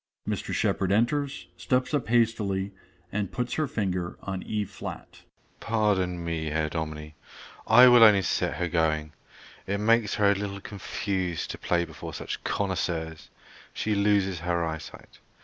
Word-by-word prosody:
Mr. - - -3
Shepard 95 -1 0
enters, 135 +3 0
steps 130 +7 0
up 145 -5 0
hastily, 110 -4 +1 0.4
and 100 -2 -2
puts 125 0 -3
her 155 -1 0
finger 90 -7 -2
on 95 -1 -4
e 105 +1 -2
flat._) - - -8
SHEPARD. - - -22 0.3
Pardon 95 -6 0
me, 80 -1 -2
Herr 75 0 0
Dominie, 75 -1 -5 0.5
I 125 +3 +9
will 120 -2 +8
only 105 -3 +7
set - - 0
her 90 - -1
going: 80 -2 0 0.5
it 100 +1 0
makes 110 0 +2
her 100 -1 +4
a - - +4
little 100 0 -4
confused 95 -3 -3
to - - -8
play 85 -1 +1
before 80 -2 -9
such - - -5
connoisseurs; 85 -5 -2 0.5
she 110 - -1
loses 100 -3 +2
her 85 0 0
eyesight. 80 -1 -8
95 Hz, 150 wpm, -27 LUFS, 85-110 Hz, 0.5 s, I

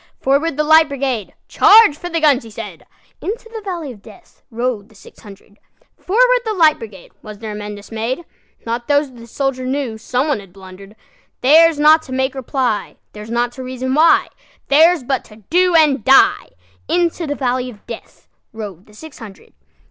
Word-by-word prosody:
"Forward, 280 +3 0
the 300 - +1
Light 315 +1 +5
Brigade! 265 -7 -4
Charge 425 -7 +6
for 350 +3 -7
the 335 -1 -1
guns!" 290 -5 +3
he 225 - -12
said:Into 225 - -9
the 445 - -6
valley 345 -8 -5
of 210 -5 -14
DeathRode 235 - -7
the 215 - -22
six - - -17
hundred."Forward, 370 - -2
the 440 -2 -3
Light 315 -4 +4
Brigade!"Was 210 0 -12
there 215 0 -7
a - - -6
man 210 0 -7
dismay'd? 225 +9 -5 0.4
Not 235 +1 -4
tho' 290 0 +2
the 240 -4 -14
soldier 270 +1 -3
knewSome 255 0 -2
one 290 -7 0
had 195 -3 -15
blunder'd:Theirs 215 - 0
not 310 +2 +6
to 270 - -13
make 265 +1 -1
reply, 260 -4 -2 0.2
Theirs 210 +1 -10
not 240 +1 -1
to 260 +1 -9
reason 260 0 -4
why, 315 +4 +4 0.4
Theirs 320 +2 +4
but 260 0 -2
to 215 - -16 0.2
do 360 0 +3
and 290 -7 +3
die:Into 335 +5 +1
the 290 - -2
valley 255 -1 -2
of 215 -4 -15
DeathRode 205 -4 -11
the 210 - -19
six 315 +6 -12
hundred. 210 -5 -13
260 Hz, 165 wpm, -17 LUFS, 220-315 Hz, 0.4 s, Charge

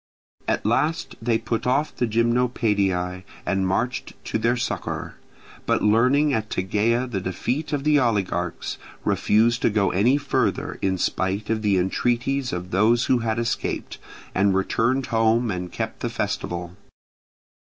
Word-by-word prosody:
At - - 0
last 160 +2 0
they 115 0 +2
put 115 +1 -3
off 145 +5 +1
the 120 - 0
Gymnopaediae 105 -6 +1 0.2
and 95 -1 +1
marched 120 +8 -1
to - - -1
their 120 +3 +2
succour, 120 - -3 0.5
but - - +2
learning 130 +7 +4
at 110 -2 -1
Tegea 110 +6 +1
the 115 -7 -3
defeat 125 - -2
of 145 -2 -1
the 150 0 +4
oligarchs, 95 -8 -1 0.3
refused 115 +4 +2
to - - +3
go 105 -2 +1
any 115 +9 +3
further 140 -1 -1
in 95 -1 +1
spite 95 +4 -1
of 110 -1 0
the 100 -3 +2
entreaties 120 +7 0
of 90 +1 -5
those 115 +6 +3
who 130 - +3
had 110 -1 -1
escaped, 115 -1 -2 0.3
and 100 0 +3
returned 120 +7 +1
home 115 +1 +3
and 90 -1 -4
kept - - -4
the - - -2
festival. 85 0 -3
115 Hz, 145 wpm, -24 LUFS, 95-125 Hz, 0.5 s, learning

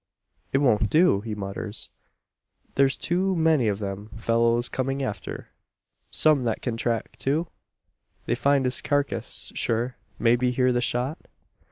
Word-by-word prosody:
"It - - +3
won't 125 -7 +3
do!" 155 - +4
he 110 -1 -5
mutters. 100 +2 -6 0.8
"There's 135 0 +3
too 185 +2 0
many 160 -7 +3
of 100 -2 +1
them 100 +1 -5
fellows 115 +1 +2
coming 135 +1 -2
after 105 -6 -5 0.6
some 155 -4 +3
that 115 - -1
can 120 -3 -1
track, 115 0 -2
too? 150 +5 0 0.8
They'd - - 0
find 140 -1 +3
his 125 - 0
carcase, 145 -1 -2
sure, 120 +2 -1 0.2
maybe 120 +2 +3
hear 125 0 +2
the 120 - +1
shot? 125 +6 -1
125 Hz, 140 wpm, -25 LUFS, 115-140 Hz, 0.8 s, do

